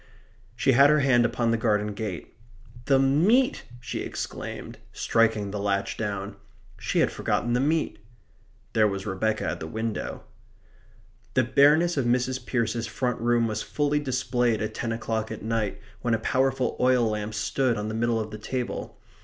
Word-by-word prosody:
She - - +2
had 140 +3 +6
her 150 -1 +4
hand 120 -3 +4
upon 115 -1 0
the 115 - +2
garden 105 -1 +1
gate. 100 -4 -5 0.5
"The 135 +1 +4
meat!" 170 - +3
she 120 - -5
exclaimed, - - -6
striking 110 -3 +1
the 105 - -4
latch 100 -1 -1
down. 100 -2 -4 0.4
She - - 0
had - - +2
forgotten 120 0 -1
the 125 - +2
meat. 155 -2 0 0.7
There 110 -2 +4
was 100 -1 -3
Rebecca 110 +2 -1
at - - -2
the 80 - -5
window. 110 +4 -4 1.1
The 130 - +4
bareness 150 +7 +4
of 135 - +1
Mrs. 125 +1 0
Pearce's 115 -2 -1
front 115 +3 -2
room 120 0 +3
was 110 -1 -2
fully 145 0 0
displayed 125 -4 0
at 110 0 -3
ten 115 - -3
o'clock 110 -1 -2
at 110 - -7
night 110 -2 -1 0.2
when 120 -2 +1
a - - 0
powerful 130 +1 0
oil 125 -1 +4
lamp 105 0 -3
stood 120 +3 0
on 105 +1 -3
the 110 - -3
middle 115 0 +1
of 110 -1 -4
the 105 - -7
table. 125 +3 -4
115 Hz, 170 wpm, -26 LUFS, 110-130 Hz, 1.1 s, had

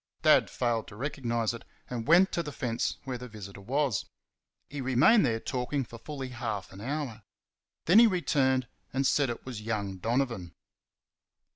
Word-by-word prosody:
Dad - - +5
failed 120 -3 -1
to 100 - -11
recognise 120 -3 -1
it, 115 - -8 0.2
and 120 -1 -5
went 180 +4 +6
to 170 - 0
the 150 -3 -6
fence 120 -4 -2
where 130 -3 -4
the 125 - -7
visitor 100 -3 -10
was. 130 0 0 0.6
He 145 -1 -6
remained 130 - +5
there 115 -1 0
talking 130 +4 -2
for 115 0 -11
fully 135 -1 -6
half 110 -6 -4
an 95 - -10
hour. 130 -3 -3 0.6
Then 185 +7 +7
he 235 - +8
returned, 135 - +1 0.2
and 135 +1 0
said 140 0 +3
it 120 - -5
was 125 -5 -6
young 105 -3 -3
Donovan. 115 -5 -1
125 Hz, 165 wpm, -29 LUFS, 115-140 Hz, 0.6 s, he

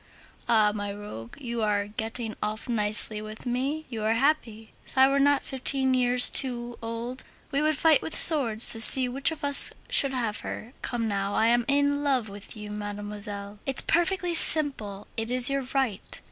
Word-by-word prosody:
Ah! 215 -3 +2
my 205 -1 -6
rogue, 200 - -11
you 235 -3 -6
are 205 -1 -2
getting 220 +2 -6
off 215 +3 -6
nicely 215 -2 -1
with 215 +2 -11
me, 270 +6 -4
you 230 -4 -8
are 220 +1 -1
happy; 230 -5 -3
if - - -16
I 265 0 +5
were 275 +1 -1
not 285 0 +1
fifteen 265 0 -1
years 250 -1 +1
too 240 -3 -2
old, 230 +3 -8 0.3
we 280 +1 -2
would 310 -1 -1
fight 320 -1 +2
with 320 - -1
swords 245 -9 +3
to 225 - +5
see 255 +2 +11
which 270 +3 -2
of 320 -2 -10
us 285 -1 +3 0.2
should 270 -1 +2
have 230 -4 -4
her. 235 +4 -10
Come 235 -2 -4
now! 200 -1 -4
I 225 +1 +1
am 240 0 0
in 285 +1 -1
love 260 -6 -2
with 200 +3 -12
you, 210 -1 -10
mademoiselle. 205 0 -8
It's 270 -1 +1
perfectly 350 +1 -1
simple. 265 -12 +2
It 225 0 -4
is 250 +1 +5
your 275 -2 -4
right. 250 -8 -4
240 Hz, 185 wpm, -24 LUFS, 215-275 Hz, 0.3 s, see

